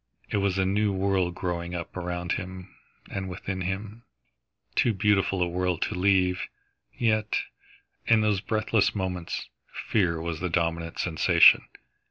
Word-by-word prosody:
It - - +1
was 100 -1 +1
a 95 - +2
new 100 +2 +1
world 95 -2 0
growing 90 -1 -3
up 85 -1 -6
around 90 0 -3
him 95 -1 -5 0.4
and 95 -1 -4
within 95 0 -5
him, 100 +5 -4 0.7
too 115 - +2
beautiful 95 -2 +2
a - - 0
world 90 0 -1
to - - -3
leave. 90 -1 +2 0.5
Yet, 110 -2 +1 0.7
in 115 -1 +5
those 105 -3 +1
breathless 110 -1 +1
moments, 90 -3 -3 0.4
fear 90 -6 +1
was 80 -1 -4
the 90 +1 -2
dominant 85 -1 -1
sensation. 80 -3 +5
95 Hz, 140 wpm, -27 LUFS, 90-100 Hz, 0.7 s, in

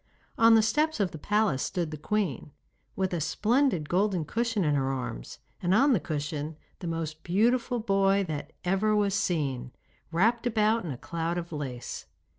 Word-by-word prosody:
On 230 0 +6
the 220 - +5
steps 300 +7 +1
of 195 -3 +1
the 160 - -8
palace 210 -8 +1
stood 175 -4 -2
the - - -4
queen, 160 - -2 0.5
with 190 -1 -1
a 170 - -1
splendid 210 - +1
golden 185 -2 +1
cushion 230 +2 0
in 150 -2 +2
her 135 -1 +1
arms, 125 - -5 0.2
and 185 +1 +2
on 275 +4 +5
the 215 - +3
cushion 150 0 -4 0.2
the 175 - -5
most 160 -1 -4
beautiful 235 +6 +1
boy 195 -2 +2
that 150 -2 -5
ever 195 +4 +2
was 205 -2 +2
seen, 140 -10 -1 0.4
wrapped 230 +8 +2
about 220 -1 +2
in 170 - -5
a 130 - -4
cloud 170 +4 -3
of 170 -1 -5
lace. 135 -6 -5
185 Hz, 175 wpm, -28 LUFS, 155-215 Hz, 0.5 s, On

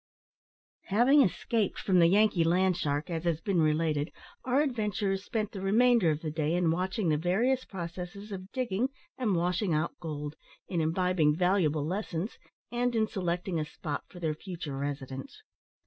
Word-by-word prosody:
Having 245 +8 +5
escaped 215 -1 0
from 185 -2 +2
the 170 - +7
Yankee 200 -1 +4
land 180 +2 +3
shark, 145 +1 -2
as 165 -1 -2
has 165 -3 +1
been 180 -1 +1
related, 155 0 +1 0.3
our 260 +3 +2
adventurers 210 -7 -1
spent 215 -1 -2
the 195 - -6
remainder 225 -1 +4
of 155 0 0
the 155 - -3
day 155 +1 0
in 175 -2 +2
watching 185 +2 0
the 150 - +3
various 230 - +1
processes 180 +3 -7
of 190 0 -7
digging 250 -1 0 0.3
and 220 -7 0
washing 175 +1 +1
out 155 +2 0
gold, 150 -2 -5 0.3
in 170 -3 -1
imbibing 160 -2 +2
valuable 170 -4 +2
lessons, 185 +2 -3 0.3
and 245 0 0
in 220 -1 +3
selecting 180 -3 -2
a - - 0
spot 150 -1 -5
for 180 - -11
their 160 -3 0
future 165 -3 -6
residence. 135 -1 -5
180 Hz, 165 wpm, -30 LUFS, 160-205 Hz, 0.3 s, the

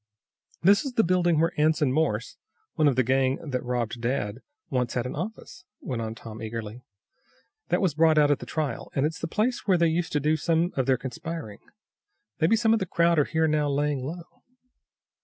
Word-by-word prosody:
"This 200 +3 +5
is 275 -3 -5
the 225 - +3
building 175 -2 +2
where 165 +1 +2
Anson 150 -3 +3
Morse, 135 -8 0 0.4
one 155 -3 +3
of 140 - +3
the 130 - +3
gang 130 +2 +2
that 125 -3 -2
robbed 120 -2 -2
dad, 115 -3 -2 0.3
once 125 -3 -1
had 125 -1 -1
an 125 - -4
office," 185 +3 -7 0.2
went 125 -4 -4
on 110 0 -4
Tom 115 -1 -10
eagerly. 110 +1 -6 0.9
"That 175 - +1
was 185 -6 +2
brought 160 0 +4
out 145 -1 +5
at 145 - +1
the 125 - -9
trial. 150 +2 -3
And 135 - +2
it's 160 +3 -3
the - - -3
place 220 +9 -1
where 185 -2 +4
they 170 -1 +3
used 165 0 -1
to 150 - +2
do 155 +2 +1
some 170 +2 +1
of 130 -1 0
their 130 -1 +3
conspiring. 130 -2 -6 0.8
Maybe 165 +7 +4
some 225 0 +3
of 225 - +2
the 190 - -3
crowd 170 -1 +3
are 145 - +3
here 160 0 +1
now 150 -1 +1
laying 145 -1 0
low." 165 +5 -8
150 Hz, 205 wpm, -26 LUFS, 125-170 Hz, 0.9 s, This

